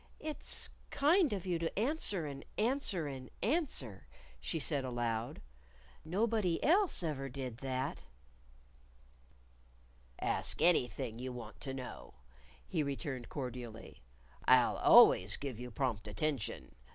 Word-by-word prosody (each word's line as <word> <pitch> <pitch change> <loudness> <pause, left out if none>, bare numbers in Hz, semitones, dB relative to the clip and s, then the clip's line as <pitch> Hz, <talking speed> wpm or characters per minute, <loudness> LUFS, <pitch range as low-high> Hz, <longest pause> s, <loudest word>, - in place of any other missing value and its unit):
"It's 305 -1 -4 0.2
kind 315 +3 +4
of 195 -3 -3
you 175 -3 0
to 165 0 -3
answer 215 - +1
and 140 -1 -6
answer 220 - +1
and 130 -3 -6
answer," 225 - -1 0.3
she 65 - -2
said 145 -2 0
aloud. 120 - -2 0.6
"Nobody 195 +1 +1
else 360 - +4
ever 135 -4 -2
did 130 -3 -5
that." 130 +1 -3 2.2
"Ask - - -1
anything 125 - +2
you 130 +1 -4
want 115 -3 -9
to 135 -1 -3
know," 130 - -8 0.5
he 155 - 0
returned 140 -3 -3
cordially. 125 -5 -6 0.4
"I'll - - +5
always 95 +3 +7
give 130 -5 -5
you 125 0 -6
prompt 115 -4 -2
attention. 125 +5 -3
140 Hz, 115 wpm, -34 LUFS, 125-185 Hz, 2.2 s, always